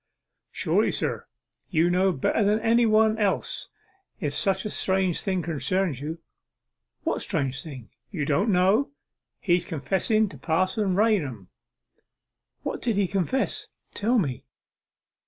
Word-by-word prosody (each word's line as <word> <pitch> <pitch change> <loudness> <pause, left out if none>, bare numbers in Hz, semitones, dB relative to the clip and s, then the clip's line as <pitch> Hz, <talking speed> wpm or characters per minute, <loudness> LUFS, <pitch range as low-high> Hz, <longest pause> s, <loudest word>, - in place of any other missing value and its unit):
'Surely, - - +1
sir, - - -2 0.4
you 165 -1 +3
know 185 +2 +3
better 175 +7 +1
than 210 +2 +3
anybody 220 -1 +3
else 205 -2 -1 0.5
if 145 -7 -2
such 190 +5 +1
a - - -1
strange 190 -2 +1
thing 190 -3 -1
concerns 160 0 -1
you.' 155 +3 -4 0.9
'What - - -1
strange 135 -1 -1
thing?' 130 -8 -10 0.2
'Don't 155 +4 0
you - - +3
know! 195 +9 +3 0.5
His 175 -3 +2
confessing 195 - +1
to - - -12
Parson 185 +4 0
Raunham.' 165 - +1 1.1
'What - - -4
did 230 -3 0
he 200 0 +2
confess? 195 +8 -1 0.3
Tell 235 +5 +1
me. 140 - -1
190 Hz, 125 wpm, -26 LUFS, 160-215 Hz, 1.1 s, you